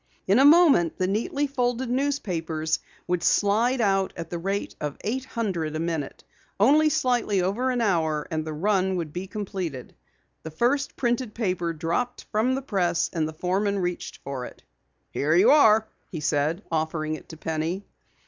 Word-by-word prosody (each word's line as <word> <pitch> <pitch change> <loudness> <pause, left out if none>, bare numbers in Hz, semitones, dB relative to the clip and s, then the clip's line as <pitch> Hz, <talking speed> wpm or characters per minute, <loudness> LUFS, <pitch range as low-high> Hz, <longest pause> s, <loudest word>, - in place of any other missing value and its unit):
In 200 +6 +4
a 270 - +6
moment 295 - +6
the 185 - +1
neatly 225 +9 0
folded 250 -2 -1
newspapers 175 - -1 0.3
would 180 -1 -1
slide 225 +8 +2
out 195 -3 +1
at 165 -1 -7
the 170 - -3
rate 195 +3 -3
of 145 -1 -3
eight 255 +5 -2
hundred 185 -11 -3
a - - -2
minute. 160 -4 -3 0.4
Only 300 +9 +5
slightly 240 -9 +1
over 220 +8 0
an 250 -2 0
hour 160 -8 +1
and 155 -1 -1
the 155 - -5
run 190 +3 +1
would 165 -4 -4
be 180 +2 -5
completed. 185 - -5 0.5
The 160 - -7
first 250 - 0
printed 240 -2 -1
paper 180 -6 -1
dropped 170 +10 -2
from 235 +4 +1
the 270 - -4
press, 175 -8 0
and 160 -3 0
the 160 - -7
foreman 195 +5 0
reached 180 -2 -3
for 135 -2 -5
it. - - -12 0.5
"Here 155 +3 +1
you 180 - +6
are," 220 -7 +5 0.2
he 165 - -5
said, 150 +5 0
offering 155 -1 -1
it 155 - -8
to 160 - -9
Penny. 160 +5 -3
190 Hz, 170 wpm, -25 LUFS, 160-235 Hz, 0.5 s, a